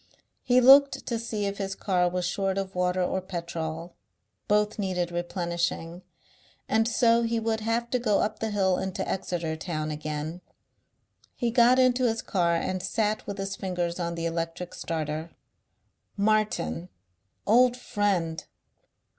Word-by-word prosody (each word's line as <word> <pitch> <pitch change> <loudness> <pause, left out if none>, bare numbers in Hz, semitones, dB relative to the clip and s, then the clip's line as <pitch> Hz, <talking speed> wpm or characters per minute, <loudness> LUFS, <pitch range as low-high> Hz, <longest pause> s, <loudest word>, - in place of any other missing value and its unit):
He 250 0 +4
looked 275 +2 +7
to 235 -2 -2
see 220 -3 -3
if 200 0 -3
his 195 -1 -3
car 180 -3 +1
was 180 0 -2
short 195 +2 -1
of 195 -1 -3
water 180 0 +1
or 190 +1 -1
petrol; 170 -2 -5 0.5
both 210 +1 +1
needed 180 -3 -1
replenishing, 175 -1 -2 0.7
and 225 +1 +2
so 235 0 +3
he 230 0 0
would 225 0 -1
have 230 +2 -1
to 250 - +1
go 215 -4 +2
up 215 +1 -1
the 220 - -1
hill 190 -3 +1
into 190 -1 -3
Exeter 170 -4 -2
town 155 -2 -3
again. 155 +3 -4 0.9
He 240 -2 -1
got 240 +2 +5
into 255 -1 +4
his 225 -1 -1
car 170 -3 +1
and 185 +2 -2
sat 210 +3 -1
with 200 -1 -4
his 195 0 -3
fingers 180 -2 -3
on 170 -1 -2
the 165 0 -3
electric 165 +1 -3
starter. 160 0 -3 0.9
Martin! 200 - 0 0.6
Old 245 +3 +5
Friend! 185 -9 -1
190 Hz, 145 wpm, -27 LUFS, 170-220 Hz, 0.9 s, looked